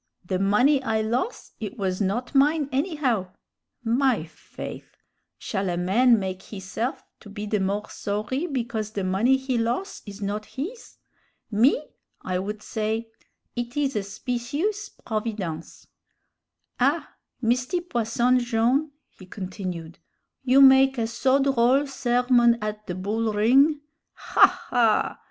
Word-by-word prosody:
the 185 0 -1
money 245 +9 +3
I 220 -4 0
los', 245 - -2
it 220 +4 -6
was 190 -1 -2
not 210 +8 -1
mine, 295 +2 +3
anyhow!' 260 - -1 0.5
My 240 - +2
faith! 165 - -10 0.4
shall 195 -3 -2
a 175 - -1
man 225 +7 +4
make 190 -2 -4
hisse'f 210 +6 -5 0.2
to 210 - -13
be 205 +1 -6
the 210 0 0
more 200 +2 -1
sorry 215 +10 -3
because 235 -7 -3
the 205 -2 -4
money 205 +8 +3
he 260 -2 -1
los' 240 - -2
is 200 0 -8
not 210 +1 -3
his? 370 - -7 0.5
Me, 250 +8 +3 0.4
I 180 -1 -1
would 210 +2 -5
say, 220 +1 -3 0.4
'It 240 +2 -4
is 275 -2 0
a 210 - +1
specious 255 - -3
providence.' 210 -8 -5 0.9
"Ah! - - +1 0.3
Misty 250 +8 0
Posson 245 -5 +1
Jone'," 240 +5 +1 0.3
he 185 - -12
continued, 180 -4 -6 0.4
"you 265 +1 +5
make 265 0 +6
a 230 - +1
so 260 +4 +2
droll 270 0 +3
sermon 245 -3 +3
ad 210 -1 -3
the 180 - -3
bull 215 +4 -1
ring. 270 +8 +4 0.3
Ha! - - +5 0.2
ha! 235 -4 +2
230 Hz, 135 wpm, -25 LUFS, 205-265 Hz, 0.9 s, make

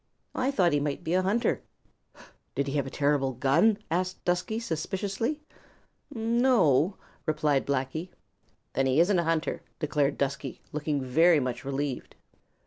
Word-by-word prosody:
"I 260 +1 0
thought 185 - +2
he 145 - +3
might 145 +3 -3
be 165 - -1
a 185 - +4
hunter." 205 +6 +1 0.9
"Did 140 - 0
he 135 - -4
have 140 -2 0
a - - -4
terrible 140 -2 +1
gun?" 150 - +3
asked 185 +2 -2
Dusky 180 +5 0
suspiciously. 205 - -2 0.7
"No 240 0 +2
o," 155 +6 +3 0.3
replied 150 -3 +1
Blacky. 140 +6 -2 0.6
"Then 135 +1 +1
he 130 +3 +3
isn't 180 +2 +4
a - - +1
hunter," 165 0 0 0.2
declared 145 -2 0
Dusky, 140 -1 -2
looking 150 -2 -1 0.4
much 125 -1 -3
relieved. 140 -1 -3
155 Hz, 140 wpm, -28 LUFS, 140-190 Hz, 0.9 s, a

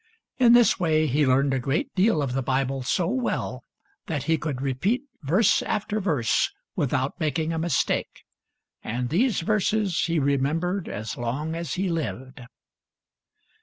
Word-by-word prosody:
In 240 -2 +6
this 240 -3 +5
way 155 -3 +2
he 145 0 +2
learned 135 +1 +3
a 135 - +1
great 135 +4 -1
deal 185 -5 +2
of 130 -3 -2
the 135 - 0
Bible 135 +1 -1
so 150 +7 0
well 245 +8 -2 0.4
that 150 -6 -2
he 160 +2 +2
could 150 -4 -4
repeat 140 - 0 0.2
verse 175 +10 +3
after 210 0 -2
verse 150 - +1 0.3
without 135 +3 -1
making 160 0 -1
a 165 - -2
mistake; 165 -3 -1 0.6
and 120 +2 -3
these 215 - +1
verses 210 -1 +1
he 170 -1 0
remembered 155 +7 0
as 110 +2 -5
long 130 +7 -3
as 165 -2 -4
he 190 +1 -1
lived. 140 -6 -4
155 Hz, 150 wpm, -25 LUFS, 135-185 Hz, 0.6 s, In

